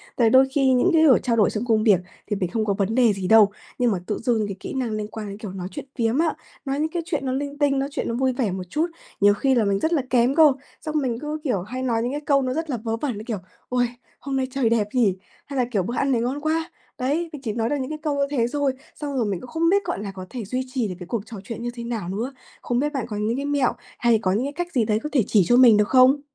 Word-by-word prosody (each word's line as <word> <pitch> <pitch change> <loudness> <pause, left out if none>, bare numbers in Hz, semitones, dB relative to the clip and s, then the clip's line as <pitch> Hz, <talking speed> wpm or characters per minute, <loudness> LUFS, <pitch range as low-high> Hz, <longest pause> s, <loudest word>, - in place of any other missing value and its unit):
tại 230 -2 +4
đôi 260 +2 +6
khi 270 -2 +3
những 255 +9 +3
cái 320 -1 +5
ổi 280 -6 +6
trao 240 -3 +1
đổi 215 -3 +4
trong 215 +2 -3
công 220 -3 +2
việc 205 -6 +5 0.3
thì 210 - -1
mình 185 -3 -2
không 220 +1 0
có 200 - +1
vấn 200 +2 -1
đề 240 -4 +4
gì 190 -2 -4
đâu, 215 -1 +6 0.3
nhưng 245 -2 +2
mà 190 - -1
tự 210 - -2
dưng 225 -3 0
cái 200 - -5
kỹ - - -6
năng 255 -4 -2
liên 215 -1 -3
quan 215 0 -7
đến, 200 - -7
kiểu, 210 -3 -7
nói 185 -1 -5
chuyện - - -7
phiếm 230 0 +1
á, 325 -1 +2 0.3
nói 275 +1 -1
những 310 +1 0
cái 345 +1 -2
chuyện 300 -6 -2
nó 260 - 0
linh 285 +2 -3
tinh, 285 -2 +2
nói 275 +1 -1
chuyện - - -3
nó 230 - -2
vui 260 +1 +1
vẻ 240 -6 -1
một 185 0 -4
chút 310 - 0 0.3
nhiều 205 0 +6
khi 265 +6 +1
là 235 - +3
mình 200 -1 +1
rất 320 +7 0
là 305 - +2
kém 250 +2 +3
cơ. 310 -3 +7 0.3
Xong 310 -1 -5
mình 240 -4 -2
cứ, 300 +2 -4
kiểu, 245 - 0
hay 255 +7 -5
nói 230 -3 +1
những 245 - -1
cái 290 +1 -3
câu 280 -2 +2
nó 255 -1 -1
rất 325 +2 -3
là 255 - -1
vớ 225 0 -3
vẩn, 250 -3 -3
như 210 - -7
kiểu: 225 -3 -2 0.3
"Uầy! 245 -1 +2 0.3
Hôm 275 0 -4
nay 260 -1 0
trời 260 -4 +1
đẹp 225 -3 +2
nhỉ," 225 -8 +3 0.3
hay 275 - -6
là, 250 - +2
kiểu: 200 -6 +1
"Bữa 235 +7 -4
ăn 275 +2 +1
này 235 -3 +2
ngon 260 +5 -2
quá," 320 +2 -1 0.3
đấy, 295 +7 -1
mình 295 - -7
chỉ 225 -5 -3
nói 225 +1 -1
được 290 - 0
những 260 - -4
cái 305 - -5
câu, 295 -2 0
ơ, 280 - +2
thế 240 -5 +1
xôi, 285 +1 0 0.2
xong 290 -2 -5
rồi 240 - +1
mình 195 -4 -2
cũng 255 - -10
không 330 +3 +1
biết, 400 +2 +3
gọi - - -2
là, 200 - -5
có 185 -1 -8
thể 240 -4 -6
duy 255 +5 -2
trì 250 -5 0
được 185 - -5
cái 180 - -8
cuộc 230 +1 -2
trò 225 -1 -9
chuyện 230 +3 -6
như 240 - -2
thế 235 -1 -7
nào 225 -7 -4
nữa. 230 +8 -3 0.3
Không 245 0 -1
biết 295 +2 -1
bạn 270 -4 -2
có 210 -3 -5
những 215 +3 0
cái 280 +2 -3
mẹo 285 -3 +1 0.3
hay 235 -2 +3
có 185 - +1
những 215 +7 0
cái 285 - -4
cách 350 +3 -4
gì 240 -4 +2
đấy 215 0 +1
có 300 - -3
thể 260 -6 +4
chỉ 205 -4 +4
cho 240 - +5
mình 240 -4 +8
được 210 0 +3
không? 260 +2 +5
245 Hz, 315 wpm, -23 LUFS, 215-280 Hz, 0.3 s, mình